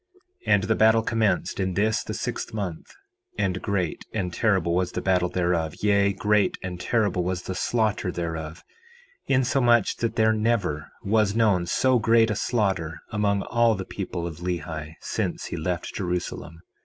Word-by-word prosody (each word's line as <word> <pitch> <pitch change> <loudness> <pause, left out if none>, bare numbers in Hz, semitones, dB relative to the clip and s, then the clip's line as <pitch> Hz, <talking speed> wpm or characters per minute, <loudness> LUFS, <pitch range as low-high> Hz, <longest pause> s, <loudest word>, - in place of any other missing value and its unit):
4:11 - - +5
And 100 - +3
the 110 +2 +2
battle 110 +1 +4
commenced 110 -6 0
in 95 -2 -1
this 110 +3 +1
the - - -5
sixth - - -4
month; 95 -6 -5 0.5
and 95 0 -1
great 95 -5 -2
and 90 -5 -2
terrible 95 -6 +1
was 90 0 0
the - - -2
battle 90 -2 +2
thereof, 85 -3 0
yea, 100 -1 +4
great 105 +1 +1
and 90 -1 -5
terrible 100 -3 +1
was 90 0 -2
the 95 - -4
slaughter 105 -1 0
thereof, 80 -1 -5 0.6
insomuch 125 -3 +3
that 115 -1 -2
there 110 0 +4
never 105 -9 0
was 105 0 +2
known 100 -6 +2
so 130 +6 +3
great 115 0 +4
a - - -1
slaughter 95 -8 -1
among 100 -2 +1
all 115 -2 +2
the 95 -1 -5
people 85 - -5
of 80 -3 -6
Lehi 80 -3 -4
since - - -3
he - - -5
left 90 +2 -3
Jerusalem. 90 -2 -4
95 Hz, 165 wpm, -25 LUFS, 90-110 Hz, 0.6 s, 4:11